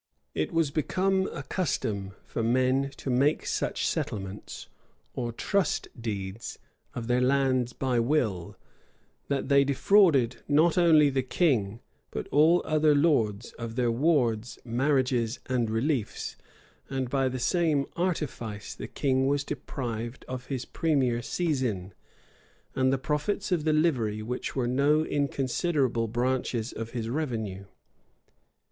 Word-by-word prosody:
It 80 - -1
was 165 -4 +1
become 190 +5 +1
a 135 - -6
custom 105 - -2
for - - -3
men 130 +4 +2
to 135 - -3
make 140 +5 +2
such - - -1
settlements, 95 0 -4 0.5
or 120 -2 -3
trust 185 - 0
deeds, 105 -3 -5 0.4
of 120 - -4
their 125 +1 +2
lands 130 -2 +2
by 125 -1 0
will, 115 - 0 0.7
that 140 -2 -1
they 140 0 +5
defrauded 140 - +4
not 155 +3 +4
only 160 -5 +5
the 135 0 +1
king, 125 - 0 0.3
but - - -5
all 160 +5 +4
other 155 -1 +3
lords, 120 -8 +2
of 115 -1 -5
their 120 -2 +2
wards, 120 -5 +1
marriages, 125 -1 +1
and 125 -3 0
reliefs; 115 +1 -1 0.5
and 135 -2 -2
by 135 +1 +1
the 130 - -4
same 150 +1 +1
artifice 135 - -3
the - - -7
king 135 -1 +1
was 140 0 +1
deprived 120 -4 -5
of 130 0 -6
his 130 -3 -3
premier 130 -7 +1
seizin, 120 - -1 0.8
and 130 0 +2
the 135 - +2
profits 150 +9 -2
of 165 -4 +1
the 155 - +3
livery, 120 -10 +1
which 125 +3 -4
were 130 -3 0
no 140 +5 +3
inconsiderable 140 -3 0
branches 120 0 -1
of 115 0 -5
his 115 -2 -4
revenue. 115 -8 -3
130 Hz, 130 wpm, -28 LUFS, 115-150 Hz, 0.8 s, they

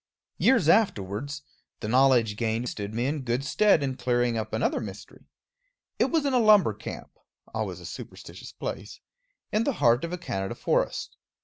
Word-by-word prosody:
Years 260 -2 +4
afterwards, 140 - +1 0.4
the 105 - -5
knowledge 125 -3 +4
gained 115 +2 -1
stood 100 -1 -5
me 115 +3 -1
in 145 +2 -1
good 125 +2 -2
stead 200 0 +3
in 135 -2 -2
clearing 120 -1 +1
up 110 -1 -3
another 110 - 0
mystery. 100 -3 -10 0.7
It - - +4
was 320 -3 0
in 275 - +1
a 250 - +4
lumber 215 -3 +5
camp - - -8 0.4
always - - -3
a - - -11
superstitious - - -9
place - - -6 0.5
in 215 +2 +2
the 280 - 0
heart 120 - +3
of 170 - -3
a 180 - -3
Canada 95 - -4
forest. - - -1
125 Hz, 170 wpm, -27 LUFS, 110-175 Hz, 0.7 s, lumber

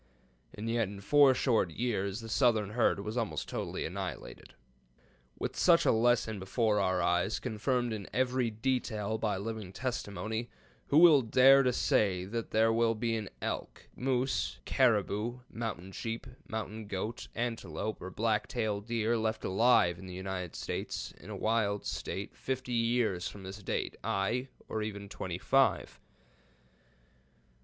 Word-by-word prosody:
And 105 +2 -5
yet, 115 -2 +1
in 100 0 -8
four 140 +5 +5
short 115 -8 +2
years 100 +1 -2
the 115 - -8
southern 110 -1 +2
herd 115 -3 +2
was 105 +4 -4
almost 115 -3 -2
totally - - -3
annihilated. - - -6 0.8
With - - -3
such - - +5
a - - +5
lesson 110 -2 +2
before 105 +2 +1
our 95 -2 +1
eyes, 90 +4 +1
confirmed 120 +1 -1
in 100 -3 -5
every 125 -1 +1
detail 110 -2 -1
by 105 -3 0
living 110 -1 -5
testimony, 110 0 -3 0.4
who 145 - +3
will 160 -4 +8
dare 130 +4 +6
to 130 -2 +2
say 95 -6 +1
that 115 +3 -4
there 110 +1 +3
will 115 0 +2
be 115 +1 -1
an 110 -3 -4
elk, - - -5
moose, 130 0 0
caribou, 120 -1 +1
mountain 100 -5 -5
sheep, 115 +3 -4 0.2
mountain 110 -3 -5
goat, 105 +4 -4
antelope, 110 -4 -3
or 95 - -5
black 105 +1 0
tail 110 -4 -1
deer 115 +1 0
left 110 -1 -1
alive 95 -4 +4
in 95 - -9
the 90 - -7
United 95 -2 -4
States - - -4
in 90 - -12
a 105 - -5
wild 105 -1 0
state - - -4
fifty 130 -1 -3
years 115 -6 +1
from 100 - -9
this 95 +2 -8
date, 95 - -2
ay, 115 +7 0 0.2
or 110 - -3
even 100 -1 -5
twenty 90 -3 -5
five? 135 +7 +2
110 Hz, 150 wpm, -31 LUFS, 100-120 Hz, 0.8 s, will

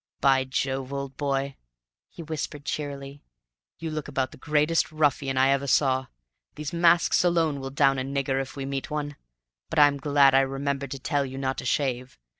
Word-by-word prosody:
"By 135 -1 +3
Jove, 130 0 -2
old 140 -1 -5
boy," 140 -1 -2 0.5
he 170 - -10
whispered 150 -2 -5
cheerily, 140 -1 -5 0.6
"you 165 -1 -5
look 155 -1 -4
about 135 -2 -2
the - - -13
greatest 150 +4 +1
ruffian 140 -3 +1
I 135 +1 +4
ever 140 0 +1
saw! 130 -1 +2 0.5
These 150 +1 -5
masks 170 +1 +4
alone 165 -5 +2
will 135 0 -5
down 135 -1 +2
a - - -1
nigger, 135 0 -1
if 135 - -8
we 135 -1 -4
meet 135 0 -4
one. 145 -1 -3 0.5
But - - -4
I'm 145 -1 +6
glad 140 -1 +4
I 135 - +6
remembered 135 0 -2
to 135 - -6
tell 145 +1 0
you 135 0 -6
not 135 -1 -2
to - - -7
shave. 130 -2 -1
140 Hz, 185 wpm, -26 LUFS, 135-145 Hz, 0.6 s, I'm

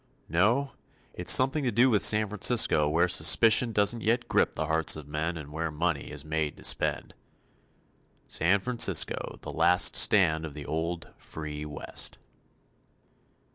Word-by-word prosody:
No, 115 +11 0 0.4
it's - - +3
something 135 +3 +4
to 130 - 0
do 120 +4 +3
with 105 - +1
San 105 0 +4
Francisco 100 -7 +1
where 85 +4 +1
suspicion 90 +8 +3
doesn't 105 +2 +1
yet 120 +3 -1
grip - - 0
the 80 - -3
hearts 80 +1 +1
of 75 -2 -10
men 80 +3 -4
and 75 -2 -10
where 80 +2 -4
money 75 -1 -3
is - - -7
made 75 -1 -3
to - - -15
spend. - - -1 1.1
San 90 +5 0
Francisco, 125 +2 0
the - - -7
last 90 +1 +1
stand 80 -6 +2
of 75 -2 -8
the 75 -2 -9
old, 85 +2 -5
free 75 -1 -8
West. 75 -1 -3
85 Hz, 150 wpm, -27 LUFS, 75-110 Hz, 1.1 s, something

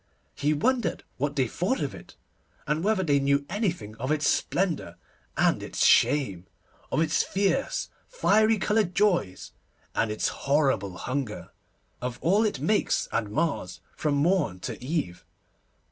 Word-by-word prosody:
He 145 +1 0
wondered 240 - 0
what 145 +2 -1
they 130 -3 +2
thought 185 - -1
of - - -2
it, - - -12 0.5
and 155 +2 -1
whether 205 -2 +2
they 145 -4 +3
knew 140 +1 +1
anything 175 - -2
of 130 +5 -3
its 155 -1 +1
splendour 180 -4 0 0.4
and - - +3
its - - -1
shame, 100 -12 +3 0.4
of - - +1
its 160 -1 +2
fierce, 200 +8 0 0.2
fiery 220 - +3
coloured 210 -3 +1
joys, 180 - +1 0.4
and 115 - +1
its 105 - -1 0.2
horrible 130 -11 +2
hunger, 125 -3 -4 0.5
of 125 -1 -4
all 195 +7 +3
it 215 - -1
makes 210 0 +1
and 115 -2 -1
mars 120 - -2 0.2
from 150 -2 0
morn 150 - +1
to - - -6
eve. 125 - -3
150 Hz, 145 wpm, -27 LUFS, 125-195 Hz, 0.5 s, they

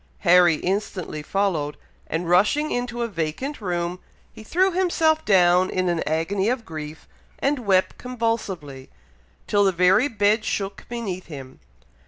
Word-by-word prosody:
Harry 175 -2 +5
instantly 185 -3 -3
followed, 160 -4 -1 0.3
and 165 +2 -3
rushing 210 - +3
into 245 -1 -2
a - - -1
vacant 200 - -4
room, 175 -1 -2 0.3
he - - -12
threw 370 - +2
himself 330 -3 +1
down 180 -2 +4
in 185 -1 0
an 170 -1 0
agony 185 +7 0
of 245 -2 -2
grief, 155 -2 -8 0.3
and 275 -5 -1
wept 190 -1 +2
convulsively, 220 - -4 0.6
till 205 -1 +2
the 195 - +3
very 185 +8 +4
bed 215 -2 +1
shook 195 -2 -4
beneath 210 -7 -5
him. 135 -4 -10
195 Hz, 140 wpm, -23 LUFS, 170-235 Hz, 0.6 s, Harry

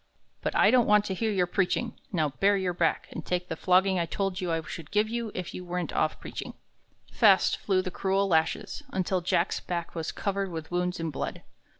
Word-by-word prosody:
"But - - -2
I - - +6
don't 250 -2 +4
want 210 0 +5
to 190 - -2
hear 220 +4 -1
your 185 -3 +2
preaching. 195 +6 0 0.2
Now 160 -6 +1
bare 200 +8 +2
your 185 -2 -1
back, 170 -1 0
and - - -6
take 180 0 -2
the - - -2
flogging 185 0 +3
I 170 - 0
told 195 0 -2
you 180 -2 -1
I 165 - +1
should 155 -1 -8
give 210 +1 +2
you 230 -1 -3
if 180 -2 -4
you 180 - -6
went 180 0 -3
off - - 0
preaching." - - -7 0.6
Fast 200 -5 +5
flew 185 -2 +1
the 185 - -4
cruel 195 +2 +1
lashes, 160 -3 0
until 185 0 0
Jack's 170 +1 +1
back 170 -2 -4
was 165 -1 -3
covered 200 -1 -2
with 160 -1 -6
wounds 180 0 -1
and 165 -1 -2
blood. - - -4
185 Hz, 215 wpm, -28 LUFS, 175-200 Hz, 0.6 s, I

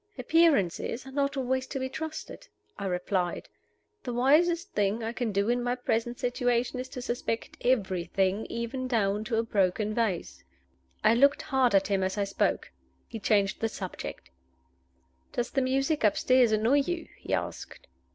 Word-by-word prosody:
"Appearances 260 - +2
are 265 - -9
not 280 0 0
always 260 0 -1
to - - -4
be 260 - -2
trusted," 315 +4 -7 0.3
I 200 - -4
replied. 180 -1 -1 0.5
"The 250 - -5
wisest 335 +8 +3
thing 205 +3 0
I 225 +1 -3
can 240 -3 -2
do 200 +1 +1
in 245 +1 +1
my 245 0 0
present 240 -1 -1
situation 245 0 0
is 255 +1 -5
to 250 -2 -7
suspect 240 -2 -3
everything, 195 -3 +1
even 235 +3 -4
down 210 -4 +1
to 230 0 -1
a 225 - +2
broken 210 0 0
vase." 215 -7 -2 0.6
I 220 - +6
looked 280 +4 +4
hard 260 -5 +2
at 195 0 +4
him 195 -1 +1
as 190 +2 -1
I 205 - +1
spoke. 195 0 -1 0.4
He 225 - -7
changed 200 -1 +2
the 225 - 0
subject. 185 - -7 1.0
"Does 240 - -2
the 270 - +1
music 270 +3 0
upstairs 245 +3 +4
annoy 225 +6 +3
you?" 335 +4 -2
he - - -1
asked. - - -6
235 Hz, 160 wpm, -28 LUFS, 205-260 Hz, 1.0 s, I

